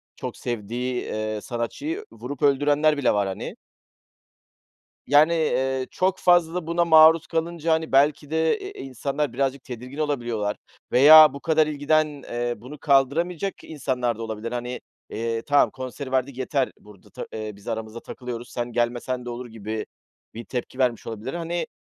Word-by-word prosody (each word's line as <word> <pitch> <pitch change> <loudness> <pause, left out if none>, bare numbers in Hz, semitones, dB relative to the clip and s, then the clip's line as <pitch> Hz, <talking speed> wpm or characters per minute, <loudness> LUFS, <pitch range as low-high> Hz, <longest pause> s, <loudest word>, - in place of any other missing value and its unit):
çok - - -6
sevdiği, 120 +2 -3
eee, 110 0 -3
sanatçıyı 290 - -4
vurup 140 +1 -8
öldürenler 145 +2 +3
bile 140 -4 +2
var, 100 -1 +1
hani. 95 - -5 1.5
Yani, 150 +4 +5
eee, 135 -5 0
çok 185 +1 0
fazla 175 -1 +3
buna 170 +1 +1
maruz 160 0 +7
kalınca, 165 0 -1
hani, 160 0 -1
belki 145 +1 +3
de, 160 - +2
eee, 395 0 -8
insanlar 135 +2 -3
birazcık 135 0 -1
tedirgin 125 +2 -8
olabiliyorlar 120 -9 -1 0.3
veya 155 +2 +9
bu 140 - -7
kadar 155 0 +2
ilgiden, 155 +1 +2 0.2
eee, 120 0 -2
bunu 125 +8 -10
kaldıramayacak 155 +8 +1
insanlar 130 -6 -2
da 115 - -5
olabilir. 110 +1 -5
Hani, 125 0 -4 0.3
eee, 115 0 -2
tamam, 145 +3 +3
konseri 130 +1 -7
verdik, 130 0 0
yeter, 130 0 0
burada 105 -2 -17
ta - - -7
biz 105 -2 -7
aramızda 110 0 -4
takılıyoruz, 120 -1 -7
sen 120 0 -3
gelmesen 120 +1 -1
de - - -5
olur, 120 +1 -6
gibi 110 -1 -5 0.5
bir 115 +1 -8
tepki 125 +1 -5
vermiş 125 -3 0
olabilir. 115 +3 -5
Hani, 170 0 -3
130 Hz, 150 wpm, -24 LUFS, 120-155 Hz, 1.5 s, veya